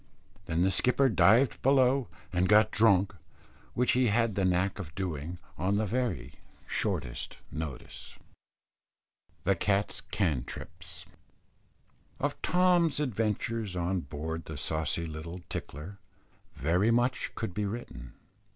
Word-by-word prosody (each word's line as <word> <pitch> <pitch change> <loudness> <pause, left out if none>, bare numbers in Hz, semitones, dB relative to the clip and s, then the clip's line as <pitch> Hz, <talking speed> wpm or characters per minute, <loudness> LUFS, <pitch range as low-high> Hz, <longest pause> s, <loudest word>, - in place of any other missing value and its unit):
Then 80 +2 +1
the 95 - +3
skipper 125 +7 +3
dived 115 +4 +4
below 135 -1 +4 0.3
and 90 +1 +2
got 105 +1 +6
drunk, 100 -3 +4 0.6
which 125 +1 +3
he 125 0 +3
had 115 +1 +2
the 95 - 0
knack 90 +2 +1
of 80 -4 -7
doing 85 -3 -3 0.2
on 95 +4 +1
the 110 - +1
very 105 - -2 0.3
shortest 75 - -2
notice. 75 -4 -7 1.3
THE 100 +2 +3
CAT'S 100 +3 0
"CANTRIPS." 80 - -3 1.1
Of - - -2
Tom's 175 -4 +3
adventures 115 -5 -1
on 90 +1 0
board 80 +2 -5
the 80 - -7
saucy 80 +2 -1
little 85 +3 -7
Tickler, 85 +8 -6 0.6
very 90 - +2
much 120 +1 +1
could 110 -5 -3
be 105 +2 -1
written. 80 - -7
100 Hz, 120 wpm, -30 LUFS, 85-115 Hz, 1.3 s, got